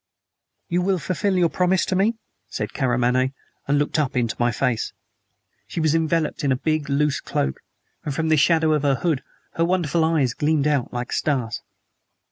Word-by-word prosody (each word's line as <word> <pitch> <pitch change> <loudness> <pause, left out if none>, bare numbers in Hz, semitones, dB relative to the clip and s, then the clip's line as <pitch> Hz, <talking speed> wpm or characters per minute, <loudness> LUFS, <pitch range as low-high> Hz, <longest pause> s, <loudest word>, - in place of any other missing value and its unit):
"You 175 +1 0
will 190 +1 +1
fulfill 185 +3 -1
your 175 -2 +3
promise 180 +3 +1
to 185 - -1
me?" 205 +5 +2 0.3
said - - -4
Karamaneh, 130 0 +1 0.3
and 145 +1 +2
looked 145 +2 0
up 135 -4 -1
into 115 -3 0
my 120 0 +2
face. 120 -1 -1 0.7
She - - -5
was 155 -2 +2
enveloped 160 -1 0
in 140 - +2
a - - +3
big, 155 +2 -1
loose 145 +1 +1
cloak, 65 - -2 0.4
and 150 - -3
from 160 +3 -1
the 155 - +5
shadow 160 +1 +3
of 150 - +1
the 140 -1 +2
hood 155 -3 0 0.4
her 165 - +3
wonderful 170 -2 +1
eyes 155 -6 +2
gleamed 150 +1 +1
out 145 -5 +1
like 120 0 -4
stars. 130 -7 -1
150 Hz, 180 wpm, -23 LUFS, 130-165 Hz, 0.7 s, the